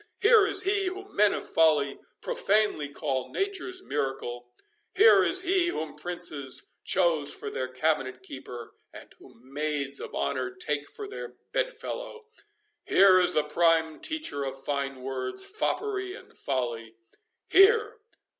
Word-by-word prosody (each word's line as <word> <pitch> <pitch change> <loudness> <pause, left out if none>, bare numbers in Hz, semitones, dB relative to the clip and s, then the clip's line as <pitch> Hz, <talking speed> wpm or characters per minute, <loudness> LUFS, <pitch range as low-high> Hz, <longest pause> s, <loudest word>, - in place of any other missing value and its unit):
—Here 430 -2 +6
is 390 -1 +1
he, 395 0 +1
whom 390 +2 -7
men 210 -1 +5
of - - -4
folly 150 -4 +2 0.2
profanely 215 - +1
call 135 -4 -3
nature's 375 -2 -3
miracle!—Here 135 - +1
is 375 0 +2
he, 365 -1 +2
whom 160 - -4
princes 150 -5 -3
chose 165 -6 +3
for - - -6
their 130 - -3
cabinet 130 -1 -1
keeper, 125 -2 -9 0.2
and - - -13
whom 125 +4 -18
maids 145 -2 -2
of - - -8
honour - - -1
take 370 - -2
for 425 -3 -8
their 405 - -8 0.2
bed - - -1
fellow!— 475 -1 -7 0.6
Here 190 -1 +6
is 180 0 +2
the 155 - +3
prime 160 0 +2
teacher 310 - -2
of 135 0 -6
fine 135 -2 -3
words, 130 - -3
foppery 395 -1 -2
and - - -15
folly—Here!" 130 - 0
165 Hz, 135 wpm, -27 LUFS, -, 0.6 s, Here